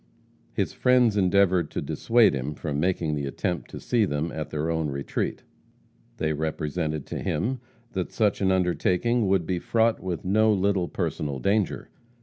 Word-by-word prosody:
His - - -1
friends 125 -4 +3
endeavored 95 -3 +3
to - - -4
dissuade 115 -5 +3
him 70 +2 -3
from 75 -1 -3
making 85 -2 0
the 70 -2 -2
attempt 90 +5 -3
to - - -8
see 120 -3 +1
them 80 -3 -1
at 80 -1 -5
their 80 +2 -2
own 80 -2 -1
retreat. 70 0 -3 0.7
They 80 0 0
represented 75 0 -2
to - - -5
him 130 +2 -1 0.3
that 95 -5 -3
such 105 -4 +1
an 95 -1 +3
undertaking 95 +5 +1
would 95 -3 +2
be 90 0 -1
fraught 115 +4 +2
with 90 -2 -4
no 110 +4 +4
little 100 -2 +1
personal 70 -3 -3
danger. 100 - 0
90 Hz, 160 wpm, -26 LUFS, 75-105 Hz, 0.7 s, no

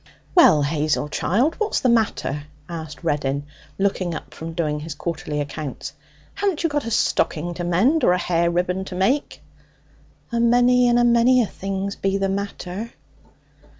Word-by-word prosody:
'Well, 160 - +6
Hazel, 150 0 0
child, 235 - +1
what's 435 - 0
the - - +1
matter?' 215 - 0 0.2
asked 160 -2 -7
Reddin, 145 -3 -1 0.3
looking 190 -3 0
up - - -8
from 165 +1 -7
doing 155 -3 -1
his 150 0 -6
quarterly 155 -2 -4
accounts. 145 -1 -5 0.4
'Haven't 390 -5 -1
you 330 - +2
got 290 -4 -2
a - - -1
stocking 175 -6 0
to 175 - -5
mend 210 - +2
or 180 - +5
a - - +2
hair 170 -1 +1
ribbon 180 +2 -1
to 185 - -7
make?' 245 +11 0 0.9
'A 235 - 0
many 245 +1 +4
and 240 0 +4
a 240 - +4
many 240 +1 +4
things 195 0 -4
be 195 0 0
the 195 -1 0
matter.' 200 +1 -4
185 Hz, 160 wpm, -22 LUFS, 160-235 Hz, 0.9 s, Well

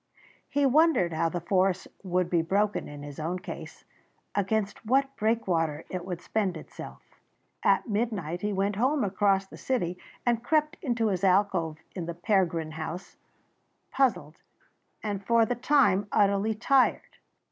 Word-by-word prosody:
He 285 0 +2
wondered 275 - +4
how 165 +1 +1
the 175 - -3
force 185 +1 +1
would 180 -2 0
be 175 -1 +2
broken 200 +5 0
in 145 -1 -9
his 145 0 -8
own 165 +4 -2
case, 185 - -9 0.5
against 205 +1 -1
what 270 +4 +1
breakwater 175 -9 0
it 180 -1 -4
would 180 -2 -4
spend 195 -6 -1
itself. 155 - -10 0.6
At - - +3
midnight, 205 -7 -2
he 210 - -1
went 200 +1 0
home 265 +5 +2
across 195 0 +2
the - - -13
city 180 -9 -2 0.3
and 240 -1 +1
crept 305 +3 +1
into 235 -7 0
his 185 -2 -2
alcove 185 -4 +2 0.2
in 175 -3 -5
the 170 - -4
Pergrin 170 -3 +1
house, 160 +3 -6 0.8
puzzled 195 - +1 0.7
and 205 -2 -3
for 230 +2 +4
the 245 - -1
time 245 -6 +3
utterly 200 +2 +2
tired. 260 +4 +2
195 Hz, 145 wpm, -28 LUFS, 175-230 Hz, 0.8 s, wondered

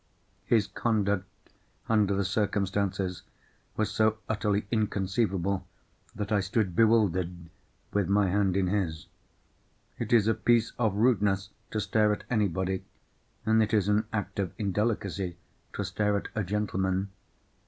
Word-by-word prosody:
His 110 -3 +4
conduct, 100 -4 -2 0.4
under 105 -3 +3
the 100 0 0
circumstances, 100 -2 -1 0.6
was 110 -1 0
so 110 +1 +2
utterly 105 -2 0
inconceivable, 100 -3 0 0.5
that 105 0 -4
I 105 - +3
stood 100 -2 0
bewildered 90 -7 +2 0.4
with 100 -3 +1
my 100 0 +3
hand 95 0 +1
in 95 - +2
his. 90 -5 -1 0.9
It 115 - -3
is 115 -3 +5
a 110 - +4
piece 115 +1 +2
of 110 -5 +1
rudeness 100 -3 +2 0.2
to 110 - -2
stare 105 0 +2
at 105 - -2
anybody, 95 -4 0 0.6
and 110 0 +4
it 110 +1 +2
is 100 -2 +2
an 105 +1 +2
act 105 -2 -3
of 95 -3 -1
indelicacy 100 -4 -1 0.4
to - - -2
stare 105 -1 0
at - - -5
a 105 - -1
gentleman. 95 -1 -1
100 Hz, 135 wpm, -28 LUFS, 95-110 Hz, 0.9 s, is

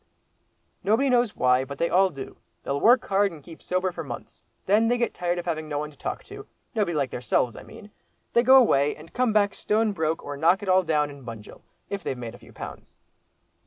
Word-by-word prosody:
"Nobody 230 +7 +2
knows 240 -3 +2
why, 125 0 +3
but 140 +1 -8
they 170 - +1
all 190 +2 +4
do; 135 -5 -9 0.3
they'll 140 +1 -2
work 245 +3 +5
hard 200 0 +2
and 155 -4 -12
keep 165 +1 -13
sober 185 0 -1
for - - -6
months. - - -9 0.2
Then 215 +4 +3
they 245 +1 +2
get 235 -1 -1
tired 175 0 -1
of 175 - -4
having 155 -3 -3
no 145 - -2
one 150 +1 -4
to - - -20
talk - - -5
to—nobody 205 -8 -5
like 140 -3 0
theirselves, 120 -1 0
I - - -9
mean. 210 -1 -13 0.4
They 235 - +5
go 260 +2 +7
away, 145 - +4
and 155 +2 -15
come 250 -2 +1
back 205 -1 +3
stone 215 +1 +1
broke, 160 -4 -2
or 145 - -5
knock 175 +7 +3
it 195 - -4
all 185 0 +5
down 150 -4 0
in 140 -1 -13
Bunjil, 115 -3 -10 0.3
if 200 -1 -3
they've 135 - -3
made 120 -2 -6
a 120 - -13
few - - -16
pounds." - - -10
175 Hz, 225 wpm, -25 LUFS, 145-210 Hz, 0.4 s, go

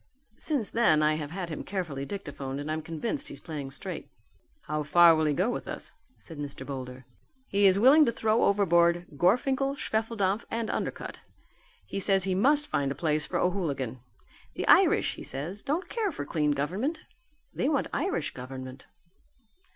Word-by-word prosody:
Since 280 -9 0
then, 160 -10 +4
I 155 0 +4
have 150 -2 -5
had 175 +1 -5
him 155 - -5
carefully 165 -8 -4
dictaphoned 140 -7 -5
and 145 +2 -4
I'm 160 0 -2
convinced 165 - -3
he's - - -7
playing 150 -5 -6
straight." 135 - -6 0.5
"How 150 0 -2
far 170 +3 +6
will 155 0 +1
he 150 - +2
go 190 - +1
with - - -5
us?" - - -5 0.3
said 160 -3 -9
Mr. 140 -2 -5
Boulder. 130 -2 -7 0.4
"He 200 0 +4
is 190 0 +4
willing 270 +8 +7
to 235 - +2
throw 220 0 +2
overboard 175 -3 +3
Gorfinkel, 265 - +2
Schwefeldampf 220 -4 -1
and 230 -1 -2
Undercutt. - - -4 0.7
He - - -4
says 195 -1 +2
he 190 0 0
must 285 +10 +3
find 140 - -1
a - - -3
place 155 0 0
for - - -2
O'Hooligan. 145 - -1 0.6
The - - -3
Irish, - - +5
he - - -8
says, 160 +10 -4
don't 315 +7 -2
care 435 -4 -1
for 145 - -5
clean 150 -1 +1
government; 205 - -2 0.5
they 270 - 0
want 290 -3 +1
Irish 370 +6 -1
Government." 130 0 -8
175 Hz, 170 wpm, -28 LUFS, 145-220 Hz, 0.7 s, willing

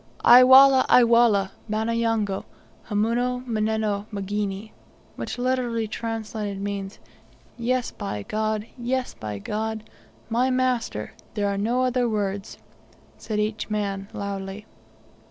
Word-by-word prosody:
"Ay 245 +1 +9
Wallah! 265 +1 +8
Ay 250 - +7
Wallah! 230 -5 +4 0.2
Bana 220 +2 -1
yango! 225 -4 0 0.5
Hamuna 240 +4 0
manneno 215 -2 -1
mgini!" 205 +1 -3 0.4
which - - -5
literally 245 -3 0
translated 215 -2 -4
means, 200 0 -4 0.6
"Yes 245 +1 -1
by 105 - -5
God! 215 - -2
Yes 255 +1 -2
by 105 -2 -6
God! 220 - -4 0.4
my 240 +3 +1
master! 255 - -1 0.2
There 205 -1 0
are 200 - -1
no 235 +6 0
other 250 -1 +1
words," 200 -2 -3 0.6
said 215 -2 -3
each 215 +1 -2
man 200 -2 -2
loudly. 200 +1 -5
220 Hz, 120 wpm, -24 LUFS, 200-240 Hz, 0.6 s, Ay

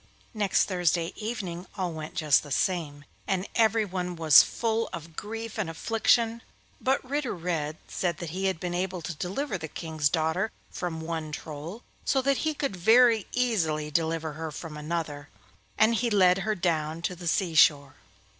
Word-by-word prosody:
Next 205 -3 +2
Thursday 175 -2 0
evening 195 -6 -5
all 180 -3 -2
went 155 -1 -7
just 150 -4 +4
the 145 - -11
same, 145 -1 -1 0.2
and 190 0 0
everyone 200 -6 +1
was 160 -3 +8
full 225 -1 -1
of 165 -1 -8
grief 225 +3 -6
and 195 -6 -1
affliction, 225 +5 +1 0.4
but 265 0 +1
Ritter 280 -3 -1
Red 160 -3 -2
said 175 -3 -2
that 170 -3 -6
he 190 +3 -3
had 190 -4 0
been 175 0 -3
able 180 -1 -2
to 175 - -4
deliver 190 - -3
the 160 - -5
King's 155 -2 -1
daughter 160 +6 0 0.2
from 165 -3 -4
one 160 -1 -4
Troll, 155 +9 -7 0.2
so 270 - +2
that 275 0 +2
he 310 -1 -1
could 275 -8 -2
very 225 +3 +5
easily 165 -12 0
deliver 160 0 -1
her 160 +1 -5
from 155 +1 -7
another, 150 -2 -4 0.5
and 215 +2 +5
he 235 +2 +1
led 190 -3 +4
her 215 +2 -1
down 165 -3 -1
to 180 - -1
the 175 0 -7
sea 170 +1 +1
shore. 140 -3 +5
175 Hz, 170 wpm, -27 LUFS, 160-215 Hz, 0.5 s, was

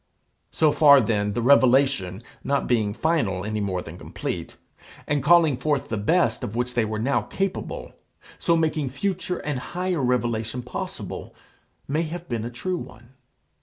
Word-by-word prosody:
So 155 -2 +3
far 145 -2 +7
then 105 -3 0
the 120 - -1
revelation, 130 -7 +3 0.2
not 140 0 0
being 110 -4 +1
final 105 - 0
any 110 0 -2
more 95 -3 -2
than 80 +2 -10
complete, - - -5 0.5
and 145 -1 0
calling 160 -2 +5
forth 145 0 -1
the 110 - -1
best 115 - +1
of 105 - -4
which 125 +1 -1
they 120 - +2
were 110 0 -3
now 130 +6 +1
capable, 195 -1 -4 0.5
so 170 -1 +2
making 155 -3 0
future 180 +5 -2
and 145 -4 -3
higher 180 +3 -2
revelation 120 -1 -1
possible, 125 - -6 0.5
may 150 +4 0
have 170 +2 -5
been 115 -5 -3
a 120 - -4
true 180 +10 -3
one. 120 -6 -11
130 Hz, 160 wpm, -24 LUFS, 110-155 Hz, 0.5 s, far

